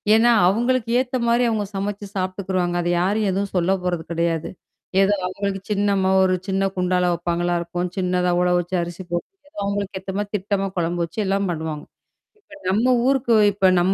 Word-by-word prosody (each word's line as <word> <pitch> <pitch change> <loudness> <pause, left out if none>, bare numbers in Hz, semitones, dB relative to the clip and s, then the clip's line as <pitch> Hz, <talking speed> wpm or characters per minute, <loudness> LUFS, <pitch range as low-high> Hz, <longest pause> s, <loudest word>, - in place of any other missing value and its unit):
ஏன்னா, 235 +2 +5 0.2
அவங்களுக்கு 235 +4 +1
ஏத்த 255 0 -1
மாரி 235 +1 +3
அவங்க 215 -2 -1
சமைச்சு 205 +1 -3
சாப்பிட்டுக்குருவாங்க. 185 -1 -1
அத 175 - -1
யாரும் 205 +3 +1
எதுவும் 195 +1 -2
சொல்ல 180 +1 +2
போறது 175 -2 -1
கெடையாது. 165 -1 -1 0.5
ஏதோ 195 +1 +4
அவங்களுக்கு 195 +1 -3
சின்னம்மா 200 -2 +2
ஒரு 185 0 +3
சின்ன 195 0 +1
குண்டால 180 0 +1
வெப்பாங்களா 175 0 -1
இருக்கும். 175 +1 -3
சின்னதா 180 -1 0
உள 180 - +2
வச்சு 175 +1 -2
அரிசி 175 +2 -6
போட்டு, 290 - -6
அவங்களுக்கு 200 -1 -2
ஏத்த 190 +1 -6
மாரி 205 0 -2
திட்டமா 195 0 -1
கொழம்பு 175 0 -1
வச்சு 170 +6 -9
எல்லாம் 195 +1 0
பண்ணுவாங்க. 160 -3 -4 0.6
இப்ப 310 -7 -16
நம்ம 220 +7 +2 0.2
ஊருக்கு, 265 -4 +3 0.2
இப்ப 195 -1 +3
நம்ம 185 +2 +2
190 Hz, 170 wpm, -22 LUFS, 175-205 Hz, 0.6 s, ஏன்னா